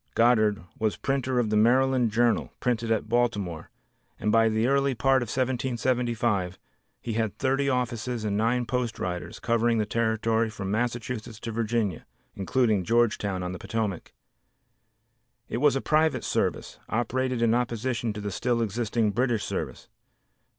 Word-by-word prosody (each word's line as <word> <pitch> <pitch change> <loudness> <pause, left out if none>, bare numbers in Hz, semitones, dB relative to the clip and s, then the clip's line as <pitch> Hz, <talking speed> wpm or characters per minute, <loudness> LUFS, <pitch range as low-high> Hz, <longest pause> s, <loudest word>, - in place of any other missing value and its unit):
Goddard 110 -5 +3 0.2
was 110 -1 0
printer 130 -2 -1
of 115 -3 +1
the - - +2
Maryland 125 +2 +4
Journal, 115 +2 +1
printed 120 -2 -1
at 110 -1 0
Baltimore, 105 -8 -1 0.5
and 105 - 0
by 115 0 +4
the 110 +1 +1
early 140 0 +2
part 130 +3 +3
of 120 - -3
1775 120 -6 0 0.4
he 115 - -4
had 110 -2 -1
thirty 135 +1 +1
offices 125 -2 -2
and 100 -1 0
nine 120 +3 +1
post 125 -2 -2
riders, 90 -1 -4
covering 115 0 +1
the 105 - +1
territory 110 0 +1
from 100 -3 -5
Massachusetts 115 0 -3
to 115 - -4
Virginia, 110 -5 -1 0.3
including 105 0 +1
Georgetown 105 -4 +1
on 90 - -3
the 90 - -6
Potomac. 105 -3 -3 1.4
It - - -3
was 145 +2 +3
a 135 - 0
private 155 +1 +2
service, - - -2
operated 125 +1 0
in 115 -1 +4
opposition 120 -1 -1
to 105 - -6
the 100 0 -3
still 120 +4 0
existing 110 0 0
British 120 -1 0
service. - - -4
115 Hz, 150 wpm, -27 LUFS, 110-125 Hz, 1.4 s, Maryland